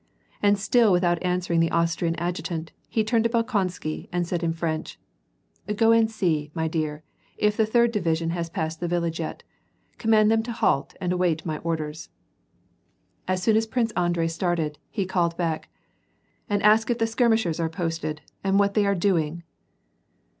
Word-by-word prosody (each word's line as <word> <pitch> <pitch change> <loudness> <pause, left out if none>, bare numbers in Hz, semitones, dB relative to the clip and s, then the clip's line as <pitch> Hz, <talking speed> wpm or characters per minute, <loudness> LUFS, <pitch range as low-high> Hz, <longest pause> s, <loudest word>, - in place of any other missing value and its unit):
And 205 0 +4
still 215 +2 +3
without 175 -2 +2
answering 180 -2 0
the 165 0 +3
Austrian 170 0 0
adjutant, 165 -1 -3 0.2
he 220 - +1
turned 225 +1 +2
to - - +3
Bolkon 230 -5 +1
sky, 155 -3 -6
and 175 0 0
said 170 0 -2
in 165 - +1
French: 160 -1 -3 0.4
'' 210 0 -9
Cro 225 0 +5
ana 225 -1 +4
see, 165 -9 -1
my 160 0 0
dear, 155 -1 -3 0.3
if 210 0 +2
the 220 0 +2
third 235 +1 +3
division 165 -5 0
has 170 -1 -3
passed 160 0 -3
the 175 - -2
village 170 -1 -1
yet: 160 - -5 0.6
command 220 -2 +4
them 225 0 +3
to 235 +2 -5
halt 220 - 0
and 180 -1 -1
await 175 -3 0
my 155 -2 -3
orders." 160 -1 -4 1.2
As 185 0 -1
soon 220 +2 +4
as 225 0 +2
Prince 230 0 0
Andrei 175 -3 0
started, 165 -3 -1
he 200 -4 -2
called 175 -2 +1
him - - -27
back, 165 -3 -2 0.3
— - - -43
'' - - -41
And 205 -1 0
ask 215 +2 +5
if 240 - +1
the 225 - +1
skirmishers 225 -7 +1
are 165 -1 0
posted, 165 -3 -3 0.2
and 195 0 +2
what 200 0 +3
they 205 -2 +2
are 200 - +2
doing. 170 -3 0
175 Hz, 185 wpm, -25 LUFS, 165-215 Hz, 1.2 s, Cro